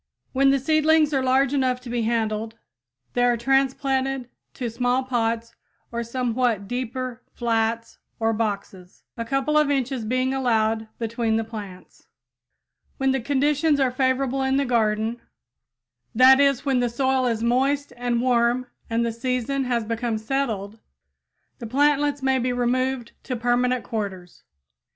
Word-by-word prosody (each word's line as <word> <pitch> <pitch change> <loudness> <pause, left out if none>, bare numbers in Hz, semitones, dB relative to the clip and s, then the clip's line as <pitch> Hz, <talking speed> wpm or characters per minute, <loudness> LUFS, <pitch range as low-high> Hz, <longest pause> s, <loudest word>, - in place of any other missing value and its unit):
When 275 +1 +4
the 275 - +4
seedlings 310 +2 +3
are 270 - +2
large 265 +1 +2
enough 260 -2 +1
to 250 - -9
be 240 -1 0
handled 220 -1 -1 0.6
they 245 - +1
are 245 -1 +3
transplanted 270 0 0 0.3
to 250 - -3
small 245 +3 0
pots 230 -2 -1 0.4
or 235 0 -2
somewhat 235 -3 -1
deeper 255 +1 -4
flats 230 -1 -1 0.2
or 225 0 +1
boxes, 200 -4 -4
a 230 - -3
couple 275 +5 +1
of 300 -1 +2
inches 265 -3 -1
being 255 +4 0
allowed 225 -4 +1
between 230 -1 -1
the 225 - +1
plants. 205 -5 -10 0.9
When 270 0 +1
conditions 290 +3 +2
are 265 -2 +2
favorable 260 +1 0
in 265 0 +1
the 280 - +1
garden; 225 -1 0 0.9
that 260 +3 +7
is, 275 -1 +3
when 270 -3 +2
the 245 -1 +1
soil 260 +1 +1
is 230 -1 -1
moist 270 +3 +1
and 240 0 -1
warm 245 0 +2 0.2
and 230 +1 +1
the 230 - -1
season 255 +3 -2
has 240 -2 0
become 230 0 -2
settled, 220 -3 -3 0.8
the 230 - -6
plantlets 290 +2 +2
may 265 -1 +2
be 250 +1 0
removed 245 0 -1
to 255 - -3
permanent 245 +1 +1
quarters. 190 -5 -5
245 Hz, 145 wpm, -24 LUFS, 230-265 Hz, 0.9 s, that